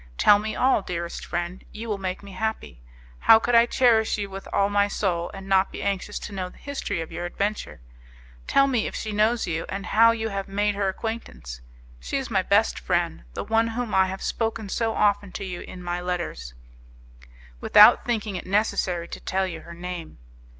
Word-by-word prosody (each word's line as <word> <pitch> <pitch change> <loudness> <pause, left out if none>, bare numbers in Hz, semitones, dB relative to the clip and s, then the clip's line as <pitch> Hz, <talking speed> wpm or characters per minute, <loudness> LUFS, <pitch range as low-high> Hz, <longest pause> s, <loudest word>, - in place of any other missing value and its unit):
Tell 205 0 +6
me 215 +1 -4
all, 260 -4 +3
dearest 170 -2 -5
friend, 175 +1 -4
you 225 +2 -7
will 210 -3 -2
make 185 0 -4
me 200 - -10
happy. 220 - -4 0.4
How 225 - +7
could 240 +2 -1
I 235 0 +6
cherish 230 -4 +3
you 200 -1 -4
with 195 0 -8
all 200 - +2
my 205 0 +2
soul, 175 -4 -1
and 195 0 -9
not 190 0 +3
be - - -6
anxious 200 +1 -2
to 210 - -7
know 185 -2 -4
the - - -18
history 280 -11 -4
of 165 - -7
your 175 +2 -4
adventure? 200 - -3 0.7
Tell 275 - +4
me 250 -5 0
if - - -6
she 215 - -4
knows 215 +3 +2
you, 165 -2 -2
and 195 0 -4
how 230 +2 +5
you 225 -1 -1
have 195 -1 -4
made 205 +1 0
her 200 -1 0
acquaintance. 190 - -6 0.4
She 65 - -3
is 265 -3 -4
my 195 -3 +3
best 200 +4 +2
friend, 175 - -1
the - - -3
one 225 +1 +2
of 230 - -5
whom 245 -3 -3
I 190 0 +4
have 190 +1 -6
spoken 225 -2 -2
so 225 +2 -1
often 205 -2 +2
to 195 - -5
you 180 -2 -5
in 180 -1 -9
my 175 0 -3
letters, 170 - -4 1.0
without 210 - +7
thinking 220 -4 -2
it - - -6
necessary 185 -4 0
to - - -8
tell 190 0 -1
you 170 -4 -6
her 170 - -11
name. 175 - -7
200 Hz, 205 wpm, -25 LUFS, 180-220 Hz, 1.0 s, How